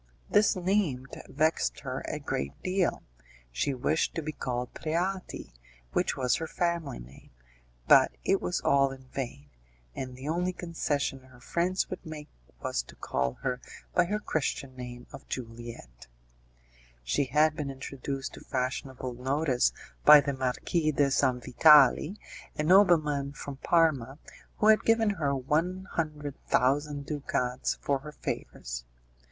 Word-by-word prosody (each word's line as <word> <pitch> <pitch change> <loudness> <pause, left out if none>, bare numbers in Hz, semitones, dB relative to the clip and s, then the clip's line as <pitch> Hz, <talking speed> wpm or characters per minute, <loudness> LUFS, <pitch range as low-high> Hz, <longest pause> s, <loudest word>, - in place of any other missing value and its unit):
This 210 0 +4
name 180 -8 0 0.2
vexed 155 +3 +1
her 130 -1 -4
a - - -2
great 70 - -4
deal, 185 -1 0 0.5
she 100 - -1
wished 155 +5 0
to 165 - -2
be 155 - -3
called 125 -4 -4
Preati, 180 - -3 0.4
which - - 0
was 125 -2 +2
her 165 - -4
family 170 -5 -1
name, 60 +3 -13 0.6
but - - +7
it - - +2
was 90 0 -1
all 140 0 +4
in 135 -1 -10
vain, 95 - -6 0.4
and 130 -1 -6
the 130 +3 -8
only 175 +3 0
concession 150 -6 -2
her 130 -1 -18
friends 175 +8 0
would - - -5
make 155 -3 -8 0.3
was - - 0
to - - -15
call 65 -1 -1
her 125 -2 -1 0.3
by 180 - +4
her 205 +4 -1
Christian 140 -8 -2
name 125 -1 -8
of - - -11
Juliette. 115 - -8 1.0
She - - +1
had 150 +4 +3
been 150 -3 -3
introduced 135 0 -5
to - - -11
fashionable 130 -1 -3
notice 130 - +1 0.3
by 150 0 +10
the 140 0 -1
Marquis 135 +5 0
de 140 -1 +2
Sanvitali, 140 - +5 0.4
a 150 - 0
nobleman 155 -6 +4
from 140 -1 -7
Parma, 140 -5 +2 0.4
who - - +1
had 215 - +6
given 225 -2 +3
her 145 -8 0
one 165 +8 0
hundred 150 -3 -3
thousand 145 +2 +1
ducats 130 -4 -1
for 140 -1 0
her 150 +2 -9
favours. - - -5
140 Hz, 140 wpm, -29 LUFS, 125-160 Hz, 1.0 s, by